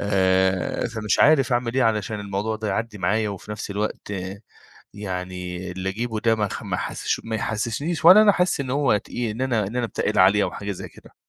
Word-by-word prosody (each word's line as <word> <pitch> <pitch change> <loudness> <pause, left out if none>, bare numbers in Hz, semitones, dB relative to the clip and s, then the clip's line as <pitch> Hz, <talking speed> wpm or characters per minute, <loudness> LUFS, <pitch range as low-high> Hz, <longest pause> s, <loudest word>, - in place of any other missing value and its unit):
آآ 95 0 +1
فمش 110 -3 -1
عارف 135 -4 +5
أعمل 120 0 0
إيه 130 - +3
علشان 110 -2 0
الموضوع 100 +2 -2
ده 110 -1 -4
يعدي 110 +1 -3
معايا 105 +2 +1
وفي 100 +1 -8
نفس 105 -1 -5
الوقت 105 +1 -3
آآ 95 0 -5 0.5
يعني 90 -2 -5
اللي 95 +1 -3
أجيبه 110 +2 -3
ده 115 0 +2
ما 105 -2 -1
ما - - -3
أحسس - - -2
ما 115 0 -3
يحسسنيش 115 +10 -2
ولا 210 +4 +10
أنا 210 -1 +6
أحس 180 -5 +1
إن 135 - -3
هو 135 -4 +2
تقيل 115 +3 -4
إن 115 - -6
أنا 115 -6 0
إن 115 - -7
أنا 125 -1 0
باتقِّل 110 -1 -1
عليه 100 +2 +5
أو - - -2
حاجة 100 0 -5
زي 95 - -7
كده. - - -18
105 Hz, 205 wpm, -23 LUFS, 100-120 Hz, 0.5 s, ولا